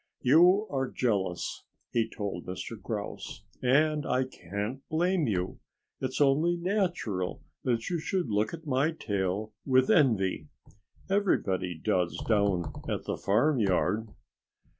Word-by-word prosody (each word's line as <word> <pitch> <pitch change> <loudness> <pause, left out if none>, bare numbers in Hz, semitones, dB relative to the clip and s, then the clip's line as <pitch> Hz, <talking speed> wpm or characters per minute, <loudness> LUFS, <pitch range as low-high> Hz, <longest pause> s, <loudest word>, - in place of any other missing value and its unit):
"You 175 - +6
are 135 -2 -1
jealous," 100 -7 -1 0.3
he 115 -1 +1
told 100 -5 -5
Mr. 95 +5 -5
Grouse. 105 0 -5 0.2
"And 150 +4 +3
I 130 0 +1
can't 105 +2 -5
blame 170 0 +1
you. 90 -4 -2 0.4
It's 130 -1 -3
only 150 +5 +3
natural 170 - -1 0.2
that 115 -3 0
you 170 - 0
should 180 0 -1
look 105 0 +1
at 165 -1 -8
my 140 +3 +1
tail 100 - -2
with 130 -1 +3
envy. 100 - +3 0.6
Everybody 95 - +1
does 90 +2 0
down 100 -7 +1 0.2
at - - -2
the - - -2
farmyard." 110 - +2
120 Hz, 120 wpm, -29 LUFS, 100-155 Hz, 0.6 s, You